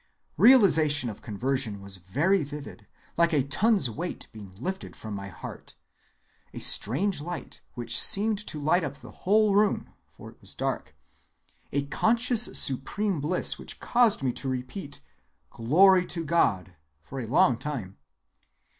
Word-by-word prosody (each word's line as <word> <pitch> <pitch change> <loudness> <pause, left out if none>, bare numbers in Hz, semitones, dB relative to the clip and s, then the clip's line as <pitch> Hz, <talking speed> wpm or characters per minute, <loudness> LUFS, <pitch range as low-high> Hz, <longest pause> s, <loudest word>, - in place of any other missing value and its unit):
Realization 155 - +5
of 105 - -14
conversion 120 0 -3
was 100 -1 -7
very 145 - 0
vivid, 145 -7 -9 0.3
like 170 0 +2
a 145 -3 +2
ton's 195 - +2
weight 160 +10 -6
being 105 -4 -12
lifted 190 - -6
from 110 -1 -9
my 100 0 -7
heart; 90 - -11 0.8
a - - -6
strange 160 - +4
light 175 +3 -7
which 120 -2 -1
seemed 210 +1 +3
to 150 - -5
light 160 +5 +1
up 140 -2 -6
the - - -14
whole 210 +1 +1
room 205 +1 0
(for - - -14
it - - -26
was - - -8
dark); - - -4 0.8
a 140 0 -2
conscious 230 - +2
supreme 150 +7 -1
bliss 170 +5 0
which - - -7
caused 235 - +1
me 125 -2 -1
to 135 - -2
repeat 135 +4 -7 0.5
'Glory 180 +10 +3
to 170 -2 -4
God' 100 - 0 0.3
for 135 - -8
a 120 - -6
long 125 +1 +3
time. 120 -7 -7
145 Hz, 145 wpm, -26 LUFS, 120-190 Hz, 0.8 s, Realization